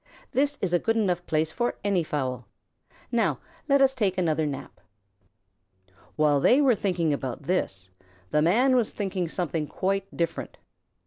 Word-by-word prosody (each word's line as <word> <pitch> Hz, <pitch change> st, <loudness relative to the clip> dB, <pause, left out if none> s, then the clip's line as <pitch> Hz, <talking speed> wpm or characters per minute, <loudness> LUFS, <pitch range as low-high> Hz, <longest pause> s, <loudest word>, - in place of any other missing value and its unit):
This 285 Hz, +2 st, +1 dB
is 180 Hz, -2 st, -1 dB
a 175 Hz, -, +4 dB
good 225 Hz, +4 st, 0 dB
enough 180 Hz, -5 st, +1 dB
place 155 Hz, 0 st, 0 dB
for 240 Hz, +7 st, -1 dB
any 195 Hz, -4 st, +1 dB
fowl. 130 Hz, -6 st, -3 dB, 0.6 s
Now 235 Hz, -2 st, +1 dB, 0.3 s
let 280 Hz, 0 st, +5 dB
us 265 Hz, 0 st, +4 dB
take 200 Hz, -7 st, 0 dB
another 160 Hz, -3 st, +1 dB
nap." 140 Hz, -1 st, -7 dB, 1.3 s
While 150 Hz, -2 st, +3 dB
they 250 Hz, -, +5 dB
were 275 Hz, -4 st, +5 dB
thinking 180 Hz, -6 st, 0 dB, 0.3 s
this, 115 Hz, -, -2 dB, 0.4 s
the 150 Hz, -, +3 dB
Man 240 Hz, -, +4 dB
was 240 Hz, -4 st, +1 dB
thinking 190 Hz, -4 st, -2 dB
something 165 Hz, -2 st, -2 dB
quite 195 Hz, +3 st, -1 dB
different. 170 Hz, -1 st, -3 dB
180 Hz, 145 wpm, -26 LUFS, 155-225 Hz, 1.3 s, let